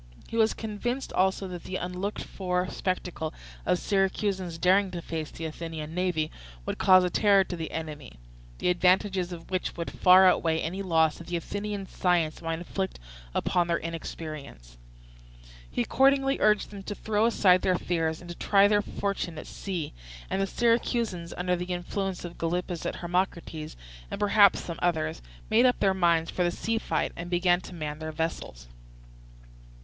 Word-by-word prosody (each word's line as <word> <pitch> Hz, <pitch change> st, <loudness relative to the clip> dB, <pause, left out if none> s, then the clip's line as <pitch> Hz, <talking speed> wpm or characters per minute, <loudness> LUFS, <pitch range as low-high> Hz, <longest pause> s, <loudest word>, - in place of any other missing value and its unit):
He -, -, -7 dB
was 225 Hz, -1 st, +3 dB
convinced 240 Hz, +4 st, -3 dB
also 190 Hz, +1 st, +1 dB
that 175 Hz, -1 st, -7 dB
the 185 Hz, -, -5 dB
unlooked 180 Hz, +3 st, -3 dB
for 180 Hz, -1 st, -2 dB
spectacle 180 Hz, -4 st, -3 dB, 0.3 s
of 180 Hz, -, +3 dB
Syracusans 190 Hz, -2 st, 0 dB
daring 190 Hz, +3 st, +4 dB
to 180 Hz, -1 st, -5 dB
face 160 Hz, -2 st, -4 dB
the 165 Hz, -, -7 dB
Athenian 160 Hz, -1 st, -6 dB
navy 175 Hz, -3 st, 0 dB, 0.3 s
would -, -, -3 dB
cause 185 Hz, -1 st, +7 dB
a 180 Hz, -, 0 dB
terror 200 Hz, -1 st, +5 dB
to 185 Hz, -, -5 dB
the 165 Hz, -2 st, -4 dB
enemy, 155 Hz, -, -6 dB, 0.4 s
the -, -, 0 dB
advantages 185 Hz, +1 st, +2 dB
of 170 Hz, +1 st, -9 dB
which 185 Hz, -1 st, -2 dB
would 170 Hz, -, -4 dB
far 185 Hz, +1 st, +7 dB
outweigh 165 Hz, -3 st, +3 dB
any 175 Hz, +4 st, -3 dB
loss 160 Hz, -4 st, +2 dB
that 170 Hz, -, -10 dB
Athenian 200 Hz, +4 st, -3 dB
science 175 Hz, -4 st, 0 dB
might 165 Hz, -1 st, -2 dB
inflict 190 Hz, +3 st, -4 dB, 0.4 s
upon 175 Hz, -1 st, +1 dB
their 170 Hz, -1 st, +1 dB
inexperience. 155 Hz, -, -7 dB, 0.9 s
He 120 Hz, -, 0 dB
accordingly 270 Hz, -, +3 dB
urged 210 Hz, -1 st, +3 dB
them 200 Hz, -1 st, -8 dB
to 205 Hz, +1 st, -5 dB
throw 215 Hz, +1 st, +1 dB
aside 185 Hz, -5 st, +4 dB
their 185 Hz, -1 st, +2 dB
fears 165 Hz, -2 st, -1 dB
and 175 Hz, -, -11 dB
to -, -, -7 dB
try 200 Hz, +2 st, +4 dB
their 205 Hz, 0 st, +3 dB
fortune 200 Hz, -5 st, -3 dB
at -, -, -7 dB
sea; 180 Hz, -6 st, -5 dB, 0.4 s
and 190 Hz, -, +1 dB
the 195 Hz, -, +1 dB
Syracusans, 230 Hz, -6 st, 0 dB
under 180 Hz, 0 st, +1 dB
the 175 Hz, 0 st, -4 dB
influence 180 Hz, +1 st, -3 dB
of 170 Hz, -, -9 dB
Gylippus 175 Hz, +1 st, -2 dB
and -, -, -3 dB
Hermocrates, 170 Hz, -3 st, -2 dB, 0.3 s
and -, -, -5 dB
perhaps 205 Hz, -1 st, +5 dB
some 170 Hz, -1 st, -6 dB
others, 160 Hz, -2 st, 0 dB, 0.3 s
made 235 Hz, +4 st, +6 dB
up 250 Hz, -, +1 dB
their 195 Hz, -1 st, +3 dB
minds 170 Hz, -3 st, +2 dB
for 180 Hz, -, 0 dB
the 175 Hz, -, +2 dB
sea 225 Hz, +6 st, -1 dB
fight 160 Hz, -7 st, -1 dB
and 170 Hz, +1 st, -6 dB
began 175 Hz, 0 st, +3 dB
to 180 Hz, -, -10 dB
man 150 Hz, -2 st, -4 dB
their 155 Hz, 0 st, -4 dB
vessels. 155 Hz, -, -4 dB
180 Hz, 170 wpm, -28 LUFS, 165-195 Hz, 0.9 s, cause